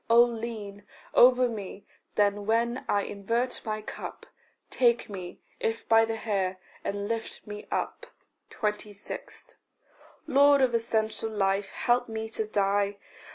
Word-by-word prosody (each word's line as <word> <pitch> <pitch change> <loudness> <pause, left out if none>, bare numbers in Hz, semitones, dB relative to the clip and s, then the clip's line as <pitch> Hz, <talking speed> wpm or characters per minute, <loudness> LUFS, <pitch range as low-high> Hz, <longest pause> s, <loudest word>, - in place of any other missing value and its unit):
Oh 235 +1 +8
lean 220 -4 -5 0.3
Over 250 0 +7
me 205 -3 -7 0.3
then 205 0 +2
when 235 +3 +1
I 205 -1 +2
invert 230 +5 -1
my 215 -1 -3
cup; - - -7 0.5
Take 235 -3 +2
me, 180 -3 -7 0.2
if 225 0 -2
by 225 0 +6
the 225 0 -2
hair, 195 -4 -1 0.3
and 200 0 -2
lift 225 0 -4
me 210 -1 -8
up. - - -3 0.4
26. 210 -1 -5 0.7
Lord 285 +1 +6
of 250 -2 +2
essential 225 -1 0
life, 195 -1 0
help 240 0 +1
me 220 0 -4
to 220 -1 -2
die. 200 -1 +1
220 Hz, 130 wpm, -28 LUFS, 205-235 Hz, 0.7 s, Oh